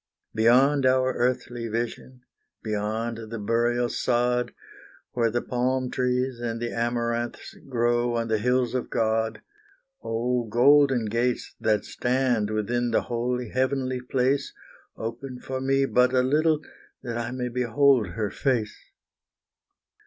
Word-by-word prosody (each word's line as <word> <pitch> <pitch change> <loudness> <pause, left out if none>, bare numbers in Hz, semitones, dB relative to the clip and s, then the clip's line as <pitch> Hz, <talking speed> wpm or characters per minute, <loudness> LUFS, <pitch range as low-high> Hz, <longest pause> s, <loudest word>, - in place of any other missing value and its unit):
Beyond 130 +5 +4
our 130 0 +3
earthly 120 -1 -1
vision 120 +3 -4 0.4
beyond 110 +1 -3
the 115 - -5
burial 120 +3 +1
sod, 125 0 0 0.6
Where 115 -2 +1
the 120 +2 -1
palm 130 +1 -1
trees 125 0 -1
and 115 -1 -3
the 120 0 -3
amaranths 120 0 -2 0.2
grow 120 -1 +1
on 115 0 -1
the 110 -1 +1
hills 125 +1 +1
of 130 - -2
God, 110 0 0 0.6
Oh, 120 +2 -1
golden 130 +2 +4
gates, 120 +3 -1
that 110 -2 +1
stand 125 -4 0
within 120 +3 -1
the 115 - +2
holy, 125 0 -2
heavenly 130 -1 -1
place, 130 +2 0 0.4
Open 125 +3 -6
for 130 +1 -5
me 135 +1 +2
but 125 -1 +3
a 130 -1 +3
little, 155 +3 +2 0.4
that 120 -1 -3
I 120 0 -3
may 125 -1 -3
behold 125 -1 +3
her 100 +4 -3
face. 120 -5 -1
120 Hz, 130 wpm, -25 LUFS, 115-130 Hz, 0.6 s, Beyond